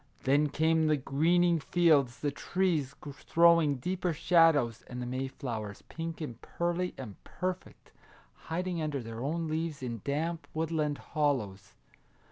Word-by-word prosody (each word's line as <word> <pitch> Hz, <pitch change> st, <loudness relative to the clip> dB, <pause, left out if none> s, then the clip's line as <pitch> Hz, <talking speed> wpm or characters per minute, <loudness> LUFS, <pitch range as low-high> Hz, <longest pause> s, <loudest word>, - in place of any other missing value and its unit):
Then 145 Hz, +3 st, +3 dB
came 160 Hz, +1 st, +2 dB
the 155 Hz, -1 st, +3 dB
greening 170 Hz, +5 st, +2 dB
fields, 150 Hz, -6 st, +2 dB
the 145 Hz, -, 0 dB
trees 155 Hz, -3 st, -1 dB, 0.3 s
throwing 170 Hz, -3 st, +5 dB
deeper 180 Hz, +6 st, -2 dB
shadows, 155 Hz, -, +3 dB
and 125 Hz, -, -7 dB
the 125 Hz, -, -3 dB
Mayflowers, 125 Hz, -4 st, -5 dB
pink 165 Hz, 0 st, -6 dB
and 120 Hz, -7 st, -6 dB
pearly 175 Hz, +1 st, -2 dB
and 110 Hz, -7 st, -9 dB
perfect, 185 Hz, +2 st, -5 dB, 0.6 s
hiding 175 Hz, +1 st, -2 dB
under 145 Hz, -4 st, -2 dB
their 115 Hz, 0 st, -7 dB
own 160 Hz, +5 st, -2 dB
leaves 155 Hz, -2 st, -3 dB
in 115 Hz, -4 st, -4 dB
damp 160 Hz, +4 st, -2 dB
woodland 155 Hz, -2 st, -1 dB, 0.2 s
hollows 125 Hz, -11 st, -1 dB
155 Hz, 130 wpm, -30 LUFS, 135-170 Hz, 0.6 s, throwing